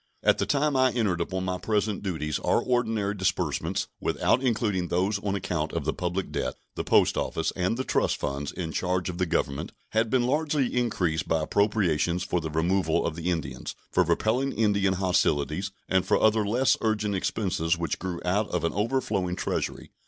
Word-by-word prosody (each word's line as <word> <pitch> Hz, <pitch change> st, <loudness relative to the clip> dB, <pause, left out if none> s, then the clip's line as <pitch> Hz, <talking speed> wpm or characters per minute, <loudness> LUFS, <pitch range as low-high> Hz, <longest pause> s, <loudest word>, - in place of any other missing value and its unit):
At -, -, +4 dB
the -, -, 0 dB
time 145 Hz, 0 st, +2 dB
I 130 Hz, -1 st, +4 dB
entered 100 Hz, -8 st, 0 dB
upon 95 Hz, +2 st, -2 dB
my 90 Hz, 0 st, -2 dB
present 105 Hz, 0 st, 0 dB
duties 80 Hz, -6 st, -2 dB
our -, -, +2 dB
ordinary 115 Hz, -5 st, 0 dB
disbursements, 95 Hz, -3 st, -1 dB
without 125 Hz, -, +1 dB
including 105 Hz, -8 st, 0 dB
those 95 Hz, +4 st, 0 dB
on 100 Hz, -1 st, -2 dB
account 90 Hz, -5 st, -2 dB
of -, -, -2 dB
the -, -, 0 dB
public 90 Hz, +2 st, -3 dB
debt, -, -, -2 dB, 0.2 s
the -, -, -3 dB
Post -, -, +3 dB
Office, 80 Hz, -, -1 dB
and 95 Hz, +5 st, 0 dB
the 130 Hz, -, -1 dB
trust -, -, +1 dB
funds 70 Hz, 0 st, -3 dB
in 85 Hz, -3 st, -4 dB
charge 90 Hz, +2 st, -1 dB
of 90 Hz, 0 st, -5 dB
the 90 Hz, -, +1 dB
Government, 70 Hz, -3 st, -1 dB, 0.2 s
had 110 Hz, +1 st, +1 dB
been 125 Hz, -1 st, +2 dB
largely 145 Hz, -1 st, +1 dB
increased 90 Hz, -10 st, 0 dB
by 80 Hz, -1 st, +1 dB
appropriations 90 Hz, -3 st, +1 dB
for 90 Hz, -1 st, -1 dB
the 80 Hz, -, -4 dB
removal 85 Hz, +5 st, +1 dB
of -, -, -2 dB
the 85 Hz, +1 st, -2 dB
Indians, 70 Hz, -7 st, -3 dB, 0.2 s
for -, -, +4 dB
repelling 130 Hz, +5 st, +1 dB
Indian 100 Hz, -3 st, +2 dB
hostilities, 90 Hz, -1 st, +1 dB, 0.2 s
and 95 Hz, -1 st, +2 dB
for -, -, +2 dB
other 110 Hz, 0 st, +4 dB
less 125 Hz, +5 st, +3 dB
urgent 105 Hz, -2 st, 0 dB
expenses 90 Hz, -4 st, 0 dB
which 85 Hz, -3 st, -2 dB
grew 90 Hz, -2 st, -4 dB
out 100 Hz, +4 st, +1 dB
of 90 Hz, -2 st, -1 dB
an 85 Hz, -, 0 dB
overflowing 105 Hz, -4 st, 0 dB
Treasury. -, -, -3 dB
95 Hz, 185 wpm, -27 LUFS, 85-110 Hz, 0.2 s, At